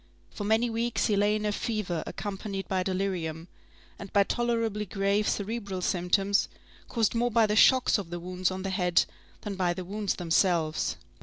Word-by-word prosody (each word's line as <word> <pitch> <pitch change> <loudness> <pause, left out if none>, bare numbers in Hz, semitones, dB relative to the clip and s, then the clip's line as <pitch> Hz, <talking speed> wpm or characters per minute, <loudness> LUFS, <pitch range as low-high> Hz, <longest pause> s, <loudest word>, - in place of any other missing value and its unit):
For 205 - -5
many 220 +3 +3
weeks 230 +1 0
he 210 - +2
lay 205 +1 +3
in 215 0 -2
a 210 - +1
fever 205 -6 -2
accompanied 195 -1 -5
by 190 -1 0
delirium, 180 -4 -2 0.5
and 200 -1 -8
by 200 - +5
tolerably 230 -2 -1
grave 200 +1 +1
cerebral 200 -3 -3
symptoms, 195 +3 +1 0.4
caused 225 -3 +1
more 240 +1 +1
by 230 -1 +4
the 210 0 0
shocks 255 0 +5
of 190 -4 -6
the 175 0 -5
wounds 180 +1 -1
on 185 0 -5
the 195 - -2
head 180 -2 +2 0.4
than 210 - -4
by 180 -2 0
the 185 - -5
wounds 205 +1 -2
themselves. 165 -2 +1
200 Hz, 175 wpm, -28 LUFS, 185-215 Hz, 0.5 s, by